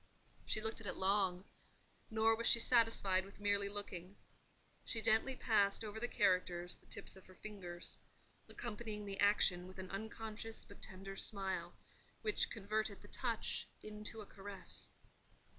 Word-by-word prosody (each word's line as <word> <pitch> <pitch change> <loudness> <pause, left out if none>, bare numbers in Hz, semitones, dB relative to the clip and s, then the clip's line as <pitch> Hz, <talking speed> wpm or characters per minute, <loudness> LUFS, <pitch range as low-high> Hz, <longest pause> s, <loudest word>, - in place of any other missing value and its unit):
She 215 - +1
looked 220 +1 0
at 215 - -7
it - - -2
long; 190 -2 +2 0.7
nor 220 0 +5
was 230 +1 +1
she 235 - +8
satisfied 225 -6 +4
with 195 +1 -13
merely 200 -1 +2
looking: 200 -2 -6 0.7
she 230 - 0
gently 225 +4 +3
passed 205 -3 +3
over 215 +1 -4
the 240 - 0
characters 180 -4 +2
the - - -22
tips 200 - -2
of 190 - -14
her 185 - -14
fingers, 180 -4 -5 0.5
accompanying 215 -2 -4
the 195 -1 -4
action 190 -3 +4
with 185 - -11
an 190 -1 -6
unconscious 220 +2 -5
but - - -14
tender 195 0 -5
smile, 195 -1 -1 0.5
which 420 - +3
converted 215 -1 -2
the 205 - -13
touch 235 -4 -1 0.2
into 215 +1 -6
a - - -8
caress. 195 -2 -6
205 Hz, 150 wpm, -38 LUFS, 190-220 Hz, 0.7 s, she